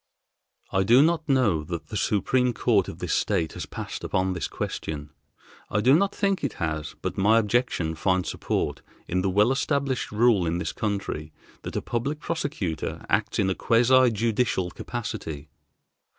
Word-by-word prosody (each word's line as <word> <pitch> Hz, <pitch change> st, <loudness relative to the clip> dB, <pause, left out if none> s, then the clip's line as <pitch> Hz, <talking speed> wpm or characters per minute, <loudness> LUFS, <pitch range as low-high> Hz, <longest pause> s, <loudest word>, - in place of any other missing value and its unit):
"I 95 Hz, -, +2 dB
do 120 Hz, +8 st, +6 dB
not 160 Hz, -1 st, +1 dB
know 115 Hz, -, +3 dB
that 85 Hz, +1 st, -6 dB
the 110 Hz, -, -6 dB
Supreme 125 Hz, +5 st, +1 dB
Court 105 Hz, -5 st, +2 dB
of -, -, -7 dB
this -, -, -2 dB
State 80 Hz, -2 st, 0 dB
has -, -, -6 dB
passed -, -, -6 dB
upon 95 Hz, 0 st, 0 dB
this 90 Hz, -, -3 dB
question. 75 Hz, -1 st, -5 dB, 0.6 s
I -, -, 0 dB
do 125 Hz, +6 st, +5 dB
not 195 Hz, +6 st, +3 dB
think 195 Hz, -4 st, 0 dB
it 140 Hz, -, -1 dB
has, 75 Hz, -2 st, -3 dB
but -, -, -3 dB
my 110 Hz, +4 st, +5 dB
objection 110 Hz, -7 st, +1 dB
finds 95 Hz, +3 st, 0 dB
support -, -, -2 dB, 0.3 s
in 90 Hz, +1 st, 0 dB
the 95 Hz, -, +1 dB
well 105 Hz, +6 st, +4 dB
established 135 Hz, -1 st, -1 dB
rule 105 Hz, -4 st, +3 dB
in 85 Hz, +1 st, 0 dB
this 90 Hz, -, -3 dB
country, 100 Hz, -7 st, -3 dB, 0.3 s
that -, -, -7 dB
a -, -, -2 dB
public 140 Hz, +6 st, -2 dB
prosecutor 145 Hz, -, -3 dB
acts -, -, +1 dB
in 95 Hz, -, +2 dB
a 95 Hz, -, +2 dB
quasi 125 Hz, +5 st, +4 dB
judicial 110 Hz, -4 st, 0 dB
capacity. 80 Hz, -, -6 dB
105 Hz, 165 wpm, -26 LUFS, 90-130 Hz, 0.6 s, do